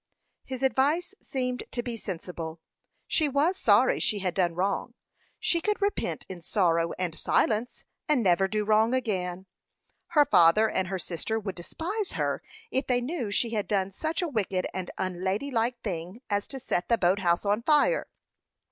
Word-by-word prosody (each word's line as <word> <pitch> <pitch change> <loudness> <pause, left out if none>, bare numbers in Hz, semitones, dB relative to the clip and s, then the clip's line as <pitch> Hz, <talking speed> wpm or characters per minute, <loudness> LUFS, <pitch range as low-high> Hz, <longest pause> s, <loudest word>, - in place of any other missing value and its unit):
His 260 -1 -5
advice 295 +8 +2
seemed 250 -2 -2
to 240 - -3
be 240 -1 -4
sensible. 170 -5 -6 0.5
She 310 -3 +1
was 290 +7 +2
sorry 230 - +4
she 215 - +1
had 185 -3 -1
done 175 -3 +1
wrong; 190 +3 -1 0.4
she 335 - +1
could 420 +4 0
repent 405 0 -1
in 180 -2 -8
sorrow 170 -2 +1
and 180 -3 -2
silence, 220 +7 0 0.2
and 280 -6 +3
never 190 0 +4
do 210 +1 -1
wrong 220 +3 +4
again. 190 -7 -2 0.6
Her 305 -5 +5
father 175 +4 +6
and 190 -3 -1
her 190 +1 -2
sister 185 +6 -3
would 200 -3 -4
despise 360 - -4
her - - -1 0.3
if 265 - -1
they 250 -1 +2
knew 245 -2 -3
she 225 +3 0
had 210 -3 -1
done 195 -2 0
such 315 - -2
a - - 0
wicked 200 - -1
and 185 -1 -4
unladylike 225 +7 -1
thing 185 +3 -5
as 205 0 0
to 270 - -6
set 180 -8 -2
the 235 - +4
boat 185 0 +2
house 175 0 +1
on 205 +3 +2
fire. 300 - +3
215 Hz, 170 wpm, -28 LUFS, 185-265 Hz, 0.6 s, father